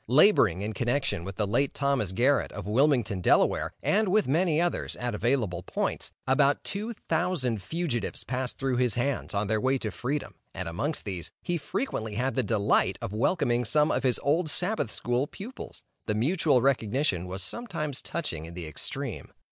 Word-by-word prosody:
Laboring 120 - +5
in 110 +1 -3
connection 120 -4 0
with 95 +1 -6
the 105 - 0
late 120 +7 +1
Thomas 140 -9 +1
Garrett, 125 +8 +2
of 105 - -6
Wilmington, 115 -4 +2
Del., - - +3
and 210 +1 +2
with 210 +3 +3
many 160 +3 +2
others, 175 0 -1
at 120 -1 -3
available 110 -6 0
points, 90 - -2
about 140 +2 +3
two 215 +4 -3
thousand 160 - 0
fugitives 155 - -2
passed 125 0 -3
through 135 -2 0
his 125 -4 +2
hands, 125 -3 -1
on 100 +1 +1
their 110 +1 0
way 130 +1 +2
to 110 -4 -4
freedom, 140 +4 -3 0.2
and 95 -1 -3
amongst 145 - -2
these, 90 -5 -3
he 175 - -1
frequently 150 - -3
had 130 +4 0
the 130 - +1
delight 105 -3 +2
of 95 - -5
welcoming 120 - +1
some 150 +6 +3
of - - +1
his 130 -2 +2
old 155 +4 +2
Sabbath 180 - 0
school 120 +5 -1
pupils. 225 - -9 0.2
The 105 - 0
mutual 140 - +2
recognition 120 - +1
was 95 +1 -4
sometimes 160 - -3
touching 85 - -3
in 85 +1 -10
the 90 -2 -5
extreme. 75 - -4
130 Hz, 175 wpm, -28 LUFS, 105-150 Hz, 0.2 s, Laboring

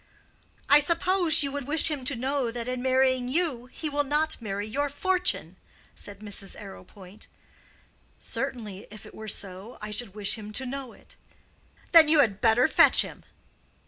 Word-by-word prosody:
"I 290 - +7
suppose 335 +1 +4
you 280 - -2
would 280 -2 -5
wish 315 +1 +2
him 285 -4 -4
to 280 - -1
know 260 +1 -1
that 235 0 -6
in 250 0 -3
marrying 260 -1 +2
you 265 -4 -1
he 310 +5 -6
will 290 0 0
not 300 +1 -1
marry 205 -1 -4
your 285 +6 -2
fortune," 365 +5 0 0.4
said 200 0 -8
Mrs. 200 -2 -4
Arrowpoint. 195 0 -13 0.9
"Certainly; 210 -5 -6
if 215 +1 -12
it - - -13
were 220 - -9
so, 195 +2 -6
I 210 0 -7
should 210 -2 -2
wish 210 +1 -1
him 210 0 -9
to 265 - -3
know 265 -1 -6
it." - - -21 0.7
"Then 330 -2 +8
you 305 -1 +5
had 205 -7 0
better 235 +3 +4
fetch - - +5
him." - - -10
255 Hz, 170 wpm, -26 LUFS, 210-290 Hz, 0.9 s, Then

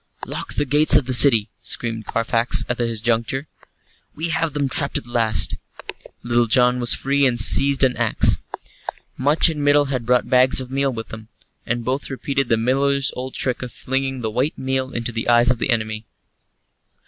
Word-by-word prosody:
"Lock - - -6
the 145 - 0
gates 150 +2 +4
of 145 -3 +4
the 130 - -2
city," 115 -5 +4
screamed 115 -2 -3
Carfax, 115 +1 +2
at 125 - -3
this 115 -2 -3
juncture. 120 +5 -2 0.7
"We 165 +2 0
have 165 -2 -1
them 145 -2 -1
trapped 130 - 0
at - - -7
last." 115 -3 0 0.7
Little 120 0 +1
John 125 +2 +2
was 120 0 +4
free 140 0 +1
and 120 -2 -1
had 110 - +7
seized 140 0 +3
an 130 -1 +2
axe. - - +2 0.8
Much 145 +6 +2
and 155 -3 -3
Middle 145 0 +3
had 120 -3 -4
brought 125 0 +1
bags 130 +1 +3
of 130 -1 -6
meal 135 0 0
with 115 -2 -7
them, 110 0 -10 0.4
and 120 0 -3
both 130 +3 -3
repeated 135 0 -3
the 115 - +2
miller's 135 +3 0
old 130 +1 -7
trick 130 -2 -2
of 125 -1 -6
flinging 135 0 -3
the 110 -2 -3
white 130 +7 -2
meal 130 0 -3
into 120 0 -4
the 115 +1 -4
eyes 120 +1 +4
of 125 - -2
the - - -2
enemy. 110 -2 -2
125 Hz, 190 wpm, -20 LUFS, 115-135 Hz, 0.8 s, had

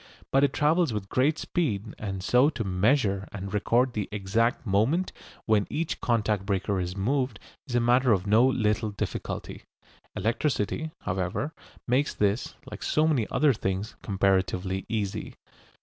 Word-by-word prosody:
But 135 +1 +4
it 140 - +4
travels 155 +2 +2
with 100 -2 -4
great 145 +5 +2
speed, 110 - -2
and 95 -3 -4
so 125 +7 +4
to 115 - -3
measure 100 +1 +1
and 100 -1 -6
record 120 +5 +2
the 105 -4 -3
exact 110 +5 0
moment 115 - +1 0.3
when 110 -2 +2
each 160 +1 -2
contact 110 -4 +1
breaker 100 0 -1
is 90 +1 -3
moved 125 +2 0 0.3
is 120 - -3
a - - +5
matter 125 +1 +3
of 95 -3 +2
no 110 +5 +5
little 110 -4 +1
difficulty. 100 - -5 0.5
Electricity, 120 +6 -1
however, 95 - -2 0.3
makes 130 +4 +1
this, 105 +3 0
like - - -9
so 155 +1 +2
many 135 -9 +1
other 150 -3 +3
things, 95 0 -3
comparatively 95 -1 0
easy. 105 -4 -3
110 Hz, 150 wpm, -27 LUFS, 100-130 Hz, 0.5 s, a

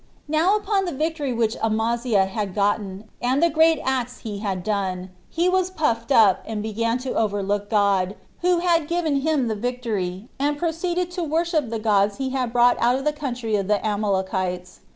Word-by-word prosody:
2. 295 - -11
Now 365 +7 +4
upon 405 -2 0
the 350 - -2
victory 305 -1 -2
which 230 -2 0
Amaziah 225 -1 +1
had 195 -1 -4
gotten, 200 -1 0 0.2
and 250 +3 +1
the 340 - +4
great 320 +1 +4
acts 250 -2 -2
he 210 -3 -5
had 195 -4 -3
done, 190 -3 -2 0.2
he 340 +2 0
was 370 0 +2
puffed 280 -10 -1
up, 215 -7 +5
and 215 -2 -3
began 230 +2 -1
to 260 - -2
overlook 205 -1 -1
God, 200 -3 +2 0.2
who 355 0 +2
had 335 -3 +2
given 335 -4 0
him 285 -3 +1
the 220 - 0
victory, 215 -4 -3
and 290 +1 0
proceeded 345 +2 -1
to 355 -1 -3
worship 320 -3 0
the 230 - -2
gods 205 -2 +2
he 265 -1 -2
had 255 -3 -1
brought 245 0 +4
out 240 +1 +3
of 270 +2 -3
the 300 - +2
country 250 -7 -3
of 195 -2 -1
the 210 0 +3
Amalekites. 190 -3 -2
235 Hz, 190 wpm, -23 LUFS, 205-305 Hz, 0.2 s, up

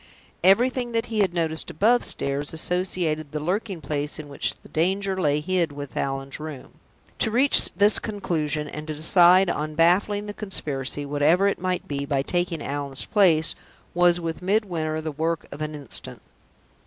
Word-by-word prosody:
Everything 240 +5 +3
that 230 0 0
he 215 - 0
had 195 -4 +3
noticed 160 -2 -2
above 225 +9 +3
stairs 140 +2 -1
associated 160 -3 -1
the 150 - -3
lurking 185 +3 -2
place 145 +1 -3
in 155 -2 -8
which 140 - -2
the - - -16
danger 190 +4 0
lay 145 -2 +2
hid 175 -1 0
with 145 -1 -8
Allan's 135 0 -3
room. 150 -4 -8 0.5
To - - +2
reach 255 +5 +4
this 205 +3 +5
conclusion, 160 -8 -2
and 150 +1 -7
to 155 - -4
decide 175 +4 +5
on 155 0 -4
baffling 195 +5 +2
the 205 - -6
conspiracy, 145 -9 -2
whatever 145 +6 +2
it 200 - 0
might 185 0 -2
be, 140 -1 -3
by 140 -2 0
taking 175 -1 -1
Allan's 140 -1 -2
place, 170 -7 +3 0.4
was 175 0 +4
with 165 -1 -4
Midwinter 180 -6 -1
the 155 0 -4
work 160 +2 -2
of 145 - -8
an 155 0 -3
instant. 140 -5 -8
165 Hz, 165 wpm, -24 LUFS, 150-190 Hz, 0.5 s, this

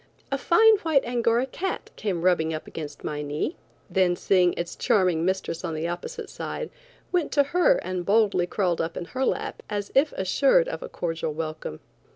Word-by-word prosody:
A 275 - +1
fine 440 +8 +6
white 320 -8 +2
Angora 235 0 +1
cat 365 +8 -4
came 185 -6 -2
rubbing 160 -3 +2
up 155 - -6
against 150 -2 -8
my 150 -1 -3
knee, 150 - -2 0.3
then 185 -2 +2
seeing 180 -1 +3
its 170 0 -4
charming 185 -8 +2
mistress 190 -2 -1
on 165 -3 -3
the 160 +2 -2
opposite 455 - -5
side, 485 - -5 0.4
went 355 -4 0
to 285 - +5
her 360 - +3
and 185 -1 -3
boldly 200 -3 +3
crawled 180 -3 0
up 165 +1 -3
in 175 - -4
her 255 +8 -3
lap - - -2
as 205 -1 -3
if 285 +3 +4
assured 275 - +3
of - - -5
a - - -6
cordial 165 -2 -3
welcome. 155 - -5
190 Hz, 185 wpm, -25 LUFS, 170-275 Hz, 0.4 s, fine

